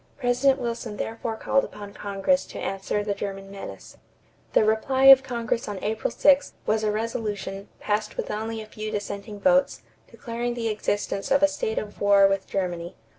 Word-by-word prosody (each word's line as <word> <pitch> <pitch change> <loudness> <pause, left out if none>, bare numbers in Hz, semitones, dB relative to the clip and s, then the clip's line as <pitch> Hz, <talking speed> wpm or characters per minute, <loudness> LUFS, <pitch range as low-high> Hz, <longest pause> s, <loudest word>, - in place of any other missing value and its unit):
President 265 +1 +2
Wilson 230 -3 -4
therefore 225 +1 -3
called 275 +4 +1
upon 205 -1 -8
Congress 205 +8 0
to - - -9
answer 195 +1 -2
the 205 -1 -1
German 195 -1 -6
menace. 110 - -9 0.6
The - - +5
reply 240 +5 +1
of 270 -1 +10
Congress 235 -3 -2
on 205 -2 -4
April 220 +1 -1
6 285 +3 +3
was 215 +1 +1
a 210 - +2
resolution, 210 -3 -3
passed 210 0 -2
with - - -3
only 220 +1 -3
a - - -8
few 215 0 -6
dissenting 205 0 -5
votes, 275 +3 +3 0.3
declaring 240 -1 -4
the 230 -2 -1
existence 205 -2 -2
of 275 +1 +3
a - - +8
state 285 -6 -3
of 210 -1 -5
war 200 -1 +6
with 195 -1 -1
Germany. 175 -3 -3
215 Hz, 175 wpm, -25 LUFS, 200-240 Hz, 0.6 s, of